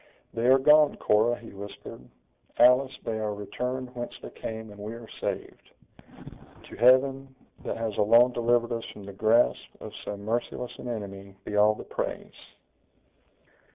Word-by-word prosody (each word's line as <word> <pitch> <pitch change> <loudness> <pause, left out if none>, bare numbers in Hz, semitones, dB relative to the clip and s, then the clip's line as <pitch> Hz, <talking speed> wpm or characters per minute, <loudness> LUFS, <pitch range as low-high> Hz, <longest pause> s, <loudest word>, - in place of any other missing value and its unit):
"They 115 +1 0
are 130 +1 +7
gone, 150 +2 +5
Cora!" 110 +3 +2
he 115 - -12
whispered; 100 -10 -10 0.5
"Alice, 125 +2 +5
they 110 -1 -3
are 105 -1 -2
returned 125 +5 -5
whence 120 -1 -6
they - - -10
came, 110 -1 -7
and 105 - -13
we 105 +3 -6
are 115 -1 -11
saved! - - -6 0.9
To - - -12
Heaven, 135 +2 +3 0.3
that - - -4
has 115 -2 -3
alone 115 +4 +5
delivered 120 0 +1
us 115 -1 -3
from 105 - -12
the 100 0 -9
grasp 110 +4 +3 0.2
of - - -9
so 105 - -5
merciless 115 +4 -3
an - - -7
enemy, 100 -4 -7
be 105 - -4
all 105 +1 +5
the - - -9
praise!" - - -5
115 Hz, 155 wpm, -27 LUFS, 105-125 Hz, 0.9 s, are